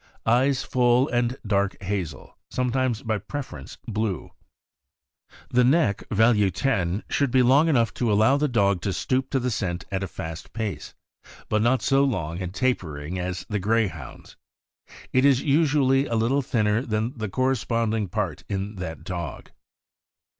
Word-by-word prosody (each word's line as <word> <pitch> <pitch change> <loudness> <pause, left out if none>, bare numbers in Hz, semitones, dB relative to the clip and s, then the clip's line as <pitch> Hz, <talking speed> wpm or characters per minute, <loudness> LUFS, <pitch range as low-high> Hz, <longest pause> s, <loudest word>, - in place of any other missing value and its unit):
Eyes 130 +4 +3
full 125 +1 +3
and 120 +1 0
dark 100 -1 0
hazel; 90 -8 -4
sometimes, 125 -2 -1
by 110 -2 -1
preference, 100 - -7
blue. 110 -5 -2 1.2
The 125 0 +4
neck 125 - +2
(value 110 -2 +4
10) 100 -2 -1
should 140 -2 +1
be 130 +1 +4
long 140 +6 +5
enough 120 -8 +2
to 120 -3 +2
allow 110 +6 +4
the 150 +1 +1
dog 100 -7 +2
to 100 - -1
stoop 130 +7 -1
to 135 - +1
the 125 0 -1
scent 90 -4 -3
at 95 0 -1
a 95 - -2
fast 80 -1 -7
pace, 105 -8 -4 0.5
but 110 - +2
not 120 +3 +2
so 135 0 +3
long 90 - -2
and 90 -1 -4
tapering 90 - -2
as 90 0 -4
the 105 -2 -2
Greyhound's. 100 - -2 0.8
It 130 - +4
is 135 -2 +4
usually 140 -3 +3
a 115 - -2
little 120 +6 +2
thinner 110 -3 +1
than 115 0 -2
the 110 -4 -4
corresponding 115 -3 0
part - - -3
in 100 +1 -3
that 80 -3 -6
dog. 90 -2 -6
110 Hz, 155 wpm, -25 LUFS, 95-130 Hz, 1.2 s, long